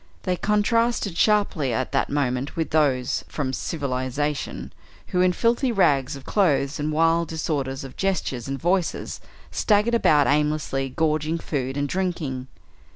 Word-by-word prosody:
They 180 - 0
contrasted 210 0 +1
sharply 200 - +2
at 120 +3 -1
that 135 - +1
moment 135 -1 -1
with 165 -1 -2
those 135 -5 +1
from 135 -3 -3
"civilization," 140 0 -3 0.4
who 180 - +1
in 180 0 +4
filthy 235 +6 +1
rags 140 - +2
of 135 - -11
clothes 150 -7 +1
and 150 +1 -1
wild 165 +2 +2
disorder 155 -4 -2
of 135 -1 -7
gestures 170 -11 -1
and 135 0 -3
voices 175 0 -1 0.3
staggered 210 +2 +2
about 150 -11 +4
aimlessly 150 -2 0
gorging 155 +3 0
food 135 -4 -3
and 145 0 0
drinking. 155 -7 -2
150 Hz, 140 wpm, -24 LUFS, 135-180 Hz, 0.4 s, in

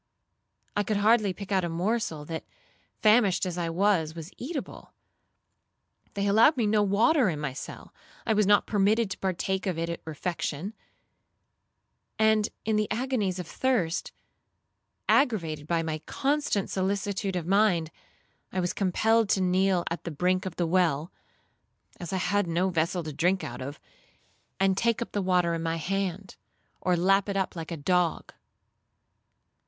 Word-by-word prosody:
I 205 - +2
could 205 +1 -1
hardly 215 -1 +3
pick 200 +2 -8
out 190 -2 +2
a 170 - -1
morsel 170 -3 -1
that, 160 +1 -5 0.6
famished 210 -4 +4
as 180 -2 -3
I 170 -2 -2
was, 170 -3 +1
was 165 +2 -8
eatable. 280 +2 -7 1.2
They 200 0 -1
allowed 220 +9 +5
me 235 - +2
no 210 0 +3
water 220 - +3
in 155 -4 -3
my 150 -3 -3
cell; 130 - -9 0.3
I 220 - +2
was 210 -2 +2
not 205 0 +5
permitted 210 +1 +2
to - - -5
partake 190 +1 -2
of 180 -3 -1
it 165 +1 -2
at 170 - -6
refection; 165 +3 -4 1.4
and, 220 -1 +3 0.2
in 220 -1 +1
the 215 0 0
agonies 225 -6 -1
of 180 - -4
thirst, 190 -5 -1 1.0
aggravated 165 - +1
by 165 0 +1
my 155 -1 -3
constant 280 -8 0
solicitude 195 0 -1
of 175 -3 -2
mind, 180 -4 +2 0.6
I 190 - -2
was 175 -1 -1
compelled 220 +3 +2
to - - +3
kneel 185 0 +2
at 165 - -4
the - - -4
brink 180 +4 0
of 175 - -6
the 175 - 0
well, 165 -3 +1 0.9
(as 175 - -6
I 190 - 0
had 205 +1 +1
no 175 +3 +1
vessel 170 +1 0
to 155 -1 -6
drink 180 +6 +1
out 120 - -6
of), 140 +3 -6 0.8
and 195 0 +3
take 230 +3 +1
up - - -13
the 205 - -1
water 180 -2 +2
in 165 - -2
my 165 0 -1
hand, 190 +2 -3 0.4
or 180 -1 +2
lap 195 +3 +3
it 195 -2 -1
like 165 -2 -6
a 170 - -4
dog. 175 +2 0
190 Hz, 160 wpm, -27 LUFS, 170-205 Hz, 1.4 s, allowed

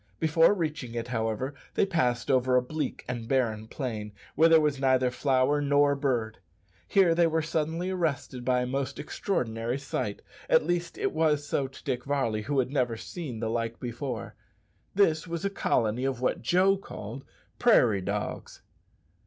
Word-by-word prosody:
Before 165 +5 +4
reaching 155 - -3
it, 115 0 -4
however, 115 +3 -2 0.2
they - - +3
passed 125 -10 0
over 130 -1 +3
a 125 - +5
bleak 150 +1 -4
and 120 -2 -4
barren 115 -4 0
plain 110 -6 -5 0.2
where 160 +3 +5
there 165 -1 +7
was 150 -3 0
neither 130 -2 +3
flower 135 +2 +2
nor 145 0 +3
bird. 120 -6 -1 0.5
Here 190 -4 +4
they 170 0 +4
were 160 0 0
suddenly 160 +3 -1
arrested 150 -8 -2
by 125 0 +2
a - - -1
most 135 +1 -3
extraordinary 120 - -2
sight 125 -6 -4 0.3
at - - +4
least 175 0 -2
it - - 0
was 155 -2 +1
so 140 -2 -1
to 130 - -14
Dick 125 -3 -2
Varley, 135 -6 0
who 140 +6 -2
had 130 -1 +1
never 125 -5 0
seen 130 -5 -6
the 110 - -1
like 115 0 -2
before. 125 +2 -5 0.6
This 175 -4 +3
was 170 +2 -4
a 200 - 0
colony 120 - 0
of 135 -3 -1
what 125 - 0
Joe 185 +8 +3
called 130 - -8 0.4
"prairie 120 - +4
dogs." 100 +2 -4
135 Hz, 170 wpm, -28 LUFS, 120-155 Hz, 0.6 s, there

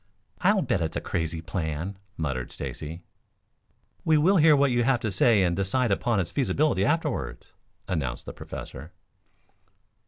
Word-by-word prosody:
"I'll - - +3
bet - - 0
it's 80 -1 -2
a - - 0
crazy 80 -1 -3
plan," 80 +2 -3 0.2
muttered 65 -6 -3
Stacy. 80 +3 -6 1.0
"We 160 -1 +4
will 185 +6 +4
hear 155 -2 +6
what 140 -1 +3
you 120 0 +2
have 125 0 +2
to 110 -4 -1
say 100 +1 +4
and 85 -1 +1
decide 100 +5 +1
upon 110 +2 +1
its 90 - -2
feasibility 145 +2 +1
afterwards," 150 -3 -2 0.3
announced 70 -8 -3
the - - -7
Professor. 75 +6 -9
100 Hz, 150 wpm, -26 LUFS, 80-135 Hz, 1.0 s, hear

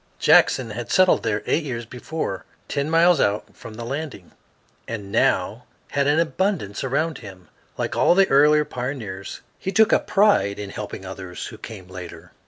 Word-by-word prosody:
Jackson 120 -4 +4
had 120 +3 -6
settled 185 -1 +4
there 105 -1 -1
eight 165 - +1
years 120 -5 -4
before, 125 - -5 0.2
ten 140 +1 -2
miles 165 0 +4
out 105 -3 0
from 110 -1 -11
the 120 - -7
landing, 135 - -6 0.6
and 105 -4 -6
now - - +1 0.3
had 140 -1 +1
an 145 +1 +3
abundance 165 - -1
around 155 +5 -1
him. 95 -6 -12 0.3
Like - - -2
all 175 - +4
the 195 0 +5
earlier 150 +2 +5
pioneers, 120 -8 -6 0.2
he 190 - -3
took 220 +1 +4
a - - +5
pride 195 - +2
in 100 -1 -6
helping 100 -2 -7
others 95 -1 -7
who - - -9
came 100 -5 -9
later. 90 -1 -10
125 Hz, 170 wpm, -23 LUFS, 100-160 Hz, 0.6 s, the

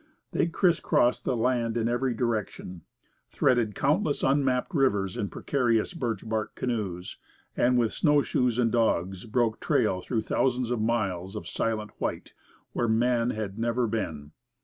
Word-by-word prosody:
They - - +1
crisscrossed 165 -8 +2
the 125 - 0
land 120 -1 0
in 115 -1 +1
every 120 +1 0
direction, 110 -6 -3 0.5
threaded 120 -5 +1
countless 145 +1 +1
unmapped 135 +3 +1
rivers 105 - +1
in 100 - -2
precarious 120 -1 0
birch 115 - -3
bark 110 -1 -2
canoes, 100 -8 -3 0.4
and 125 +1 +3
with 115 -2 +1
snowshoes 140 -6 +2
and 120 -2 +2
dogs 95 -5 0
broke 115 0 0
trail 90 - +1
through 115 +3 -1
thousands 125 +1 0
of 120 -3 0
miles 100 -4 -1
of 105 - -6
silent 110 -2 -2
white, - - -3 0.4
where 120 - 0
man 120 +1 +2
had 110 -2 -4
never 120 +1 +1
been. 80 -10 -3
115 Hz, 145 wpm, -27 LUFS, 105-125 Hz, 0.5 s, and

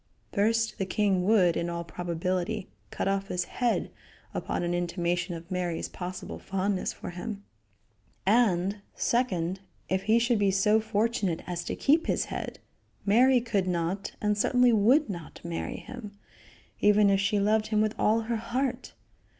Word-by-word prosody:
First, 225 +2 +1
the 195 - 0
king 190 -2 +1
would, 185 -5 +4
in 170 - -1
all 170 0 -3
probability, 180 +4 -3 0.2
cut - - -3
off 195 0 0
his 180 -2 -1
head 245 -2 -1 0.4
upon - - -2
an 175 0 -1
intimation 175 0 -1
of 165 +2 -10
Mary's 180 -2 -2
possible 180 0 -6
fondness 195 0 -1
for - - -8
him; 200 +3 -6 0.8
and, 200 -3 +3 0.2
second, 190 -7 0 0.3
if 190 0 +1
he 220 +2 +4
should 235 -1 +2
be 200 -1 +3
so 205 +3 +3
fortunate 215 -5 0
as 175 -1 -4
to - - -3
keep 315 +4 +3
his - - +1
head, - - -5 0.5
Mary 250 +5 +5
could 210 -6 0
not, 180 +2 -2
and 210 -1 +1
certainly 250 +2 +4
would 245 +9 +4
not, 170 -6 -7
marry 170 -1 -4
him, 210 -5 -9 0.6
even 205 -1 +5
if 195 - +3
she 200 +1 +1
loved 215 +2 +2
him 215 -1 +1
with 215 0 +2
all 220 +2 +3
her 230 +1 -2
heart. 250 +2 -2
200 Hz, 160 wpm, -28 LUFS, 180-225 Hz, 0.8 s, Mary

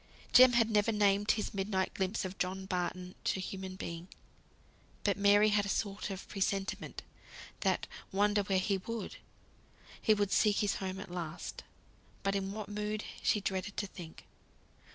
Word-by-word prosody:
Jem 255 0 +9
had 230 -1 +4
never 210 +1 +3
named 205 0 +3
his 215 - -3
midnight 195 -1 0
glimpse 190 +1 -1
of 185 +1 -6
John 190 +1 -2
Barton 180 -1 -2
to - - +1
human 190 0 -5
being; 170 -1 -6 1.0
but 200 - +2
Mary 205 +1 +5
had 205 -1 +3
a 200 - -3
sort 200 0 -1
of 195 -1 -6
presentiment 195 0 -2 0.6
that - - +1 0.3
wander 205 +1 +3
where 195 -1 +1
he 195 +1 +1
would, 230 +4 -5 0.8
he 215 - +5
would 205 -1 0
seek 210 -2 +4
his 205 -1 +1
home 190 0 -4
at 195 - -8
last. 170 -2 -5 0.6
But 195 0 +1
in 195 -1 -1
what 210 0 -5
mood 210 +1 -3 0.2
she 210 - +2
dreaded 190 +1 -3
to 205 - 0
think. 175 -4 -10
200 Hz, 160 wpm, -33 LUFS, 190-210 Hz, 1.0 s, Jem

